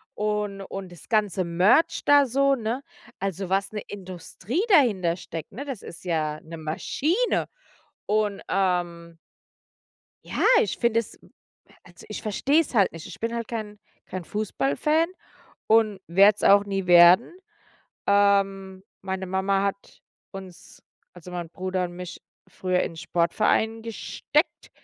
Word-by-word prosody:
und 210 Hz, -1 st, -2 dB
und 195 Hz, -1 st, -7 dB
das 170 Hz, -5 st, -14 dB
Ganze 210 Hz, -4 st, +1 dB
Merch 185 Hz, -, +3 dB
da 290 Hz, -1 st, +6 dB
so, 275 Hz, +2 st, +2 dB
ne? 235 Hz, +1 st, -3 dB, 0.4 s
Also, 195 Hz, -1 st, -3 dB
was 195 Hz, +2 st, 0 dB
'ne 210 Hz, -, -4 dB
Industrie 195 Hz, -, -5 dB
dahintersteckt, 185 Hz, -, +1 dB
ne, 280 Hz, -, -6 dB
das 270 Hz, -7 st, -6 dB
ist 165 Hz, -, -11 dB
ja 155 Hz, -3 st, -1 dB
'ne 165 Hz, +1 st, -9 dB
Maschine. 300 Hz, -, -1 dB, 0.6 s
Und, 210 Hz, -1 st, 0 dB
ähm 175 Hz, -3 st, -1 dB, 1.1 s
ja, -, -, -3 dB, 0.2 s
ich 200 Hz, -, -2 dB
finde 235 Hz, -1 st, +2 dB
es 230 Hz, -, -7 dB, 0.7 s
also -, -, -16 dB
ich -, -, -6 dB
verstehe 270 Hz, +8 st, +2 dB
es 300 Hz, -, -7 dB
halt 200 Hz, -4 st, +4 dB
nicht. 165 Hz, -1 st, -9 dB
Ich -, -, -11 dB
bin 230 Hz, +1 st, -2 dB
halt 230 Hz, -1 st, -4 dB
kein 215 Hz, -3 st, -6 dB, 0.3 s
kein 185 Hz, -2 st, -6 dB
Fußballfan 215 Hz, -, 0 dB, 0.6 s
und 215 Hz, -3 st, +3 dB
werde 195 Hz, +4 st, +5 dB
es -, -, -10 dB
auch 200 Hz, 0 st, +6 dB
nie 195 Hz, -2 st, -3 dB
werden. 175 Hz, -, +7 dB, 0.7 s
Ähm, 195 Hz, -1 st, +2 dB, 0.2 s
meine 190 Hz, 0 st, -4 dB
Mama 190 Hz, +1 st, 0 dB
hat 200 Hz, 0 st, -4 dB, 0.3 s
uns, 190 Hz, -3 st, -12 dB, 0.3 s
also 180 Hz, 0 st, -12 dB
mein 175 Hz, -2 st, -5 dB
Bruder 185 Hz, 0 st, -2 dB
und 175 Hz, -, -6 dB
mich 180 Hz, -1 st, -8 dB, 0.3 s
früher 185 Hz, -1 st, -1 dB
in 165 Hz, -, -3 dB
Sportverein 215 Hz, +7 st, 0 dB
gesteckt 245 Hz, -, -2 dB
195 Hz, 140 wpm, -25 LUFS, 180-220 Hz, 1.1 s, werden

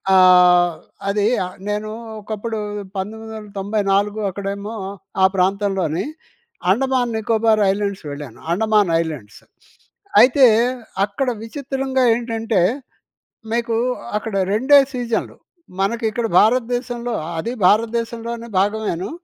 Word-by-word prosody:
ఆహ్, 180 Hz, -1 st, +6 dB, 0.3 s
అదీ 205 Hz, +1 st, +1 dB, 0.2 s
ఆహ్, 185 Hz, -, -9 dB
నేనూ 210 Hz, +1 st, -2 dB, 0.3 s
ఒకప్పుడు 220 Hz, +2 st, -5 dB, 0.4 s
1994 205 Hz, -1 st, -2 dB
అక్కడేమో, 200 Hz, +3 st, -5 dB, 0.5 s
ఆ -, -, +7 dB
ప్రాంతంలోని 190 Hz, -3 st, 0 dB, 0.7 s
అండమాన్, 255 Hz, +1 st, +1 dB
నికోబార్ 220 Hz, 0 st, +2 dB
ఐలాండ్స్ 200 Hz, -2 st, -3 dB
వెళ్ళాను, 140 Hz, -4 st, -8 dB
అండమాన్ 210 Hz, -1 st, +2 dB
ఐలాండ్స్. 145 Hz, -11 st, -7 dB, 0.8 s
అయితే, 260 Hz, +2 st, +6 dB, 0.6 s
అక్కడ 215 Hz, +6 st, -3 dB, 0.2 s
విచిత్రంగా 265 Hz, +1 st, -2 dB
ఏంటంటే, 225 Hz, -4 st, -1 dB, 0.9 s
మీకూ 230 Hz, -1 st, 0 dB, 0.4 s
అక్కడ 215 Hz, -1 st, -6 dB, 0.2 s
రెండే 265 Hz, +7 st, +6 dB, 0.2 s
సీజన్‌లు. 235 Hz, -2 st, -2 dB, 0.4 s
మనకిక్కడ 225 Hz, +3 st, 0 dB
భారతదేశంలో 245 Hz, +1 st, 0 dB, 0.2 s
అదీ 235 Hz, +10 st, -3 dB
భారతదేశంలోనే 230 Hz, +2 st, 0 dB
భాగమేను, 205 Hz, -2 st, -1 dB
215 Hz, 85 wpm, -20 LUFS, 195-235 Hz, 0.9 s, ఆ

